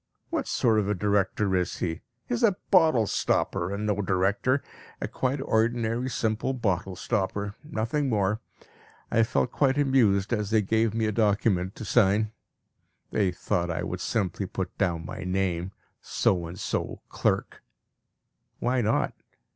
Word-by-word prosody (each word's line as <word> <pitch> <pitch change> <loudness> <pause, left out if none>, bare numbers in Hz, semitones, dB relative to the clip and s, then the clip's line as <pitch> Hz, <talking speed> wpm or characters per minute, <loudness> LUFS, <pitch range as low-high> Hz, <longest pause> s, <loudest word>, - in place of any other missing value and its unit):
What - - -1
sort 110 -3 +2
of 105 -1 -1
a 105 - +1
director 100 0 +1
is 90 -1 0
he? 80 -1 -3 0.2
He - - -3
is 240 - -1
a 205 -5 +4
bottle 160 - +5
stopper, 90 -2 0
and 100 +2 -3
no 105 -1 0
director. 100 +8 +1 0.4
A - - -2
quite 130 +2 -1
ordinary, 115 0 +1
simple 110 +2 -1
bottle 95 -5 -1
stopper 100 0 -2
nothing 140 0 -1
more. 105 0 +1 0.7
I 115 - +4
felt 115 +2 +1
quite 135 -1 +2
amused 120 -7 +3
as 105 -3 -1
they 110 -1 +3
gave 110 +2 +1
me 115 -1 +1
a 110 - +1
document 100 -3 +1
to 110 - -7
sign. 105 0 +3 0.8
They 100 -4 +2
thought 90 0 -1
I 85 - -2
would 90 0 -4
simply 100 -1 -1
put 95 -2 -4
down 85 -4 0
my - - -6
name 90 -1 -1 0.3
"So 85 -3 +1
and 85 +3 -8
so, - - -3
Clerk." - - -1 1.0
Why 125 0 +1
not? 110 0 +1
105 Hz, 155 wpm, -27 LUFS, 95-115 Hz, 1.0 s, bottle